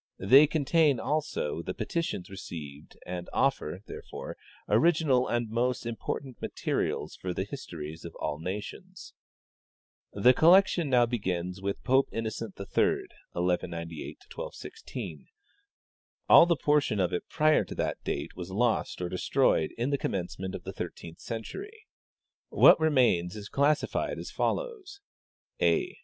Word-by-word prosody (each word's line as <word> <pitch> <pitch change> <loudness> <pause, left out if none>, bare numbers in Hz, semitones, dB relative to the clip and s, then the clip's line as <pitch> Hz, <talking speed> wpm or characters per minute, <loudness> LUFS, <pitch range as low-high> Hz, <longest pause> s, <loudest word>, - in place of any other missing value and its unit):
They 135 +10 +7
contain, 150 -2 +2
also, 145 - -2
the - - -5
petitions 120 - -3
received, 80 -6 -9
and 90 0 -5
offer, 100 - 0
therefore, - - -8 0.3
original 135 +1 +3
and 120 -1 0
most 120 +3 -1
important 120 +2 -5
materials - - -2
for 90 -1 -5
th^ 95 - -2
histories 80 - -7
of 85 - -9
all 75 - -3
nations. 105 - -7 0.5
" - - -51
The 125 - +9
collection 175 0 +5
now 125 -2 +5
begins 95 -5 -3
with 100 0 -3
Pope 135 +1 +3
Innocent 110 -2 -4
III 100 - -5 0.7
(1198 85 -2 -3 0.2
1216). 90 - -7 1.0
All 170 - +9
the 170 - +3
portion 145 -6 +1
of 90 -2 +1
it 90 - -3
prior 155 0 +3
to - - -8
that - - -2
date - - -3
was 90 0 -7
lost 110 -2 0
or - - -1
de 90 - -4
stroyed 80 - +2
in 120 +4 -1
the 140 - 0
commencement 95 0 -3
of - - -7
the - - -6
thirteenth 85 -1 -7
century. 405 - -7 0.6
What - - +7
remains 125 - +2
is 105 -1 -8
classified 145 +2 +1
as - - -7
follows: 415 -6 -3 0.6
A. 370 -2 +1
115 Hz, 135 wpm, -29 LUFS, 90-150 Hz, 1.0 s, The